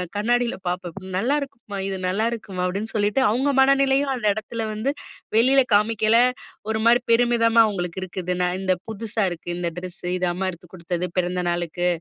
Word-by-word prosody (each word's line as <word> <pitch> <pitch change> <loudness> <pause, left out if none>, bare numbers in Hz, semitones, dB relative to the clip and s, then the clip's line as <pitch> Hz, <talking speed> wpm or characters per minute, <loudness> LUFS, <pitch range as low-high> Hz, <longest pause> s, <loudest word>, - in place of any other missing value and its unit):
கண்ணாடியில 240 +3 +1
பார்ப்பேன். 180 +1 -4
"நல்லாயிருக்குமா! 240 -1 -2
இது 195 - -3
நல்லாயிருக்குமா!" 210 0 -2
அப்படீன்னு 200 +5 -3
சொல்லிட்டு, 210 +4 +1
அவங்க 255 +6 +1
மனநிலையும் 275 +1 +4
அந்த 240 -4 -5
எடத்துல 220 +2 -5
வந்து, 215 +5 -2 0.5
வெளியில 260 +4 +5
காமிக்கயில 215 +1 +3 0.5
ஒரு 220 0 0
மாரி 235 +1 +6
பெருமிதமா 230 -1 +4
அவுங்களுக்கு 180 -4 -3
இருக்குது. 180 -1 -3
நான் 180 0 0
இந்த 190 -1 +2
"புதுசா 220 0 -3
இருக்கு, 175 -1 -9
இந்த 175 -1 -1
ட்ரெஸ்ஸு. 180 -1 -8
இது 180 0 0
அம்மா 190 +2 -2
எடுத்து 175 0 -14
குடுத்தது 175 0 -3
பிறந்த 180 0 0
நாளுக்கு, 175 0 -1
210 Hz, 155 wpm, -23 LUFS, 180-235 Hz, 0.5 s, மாரி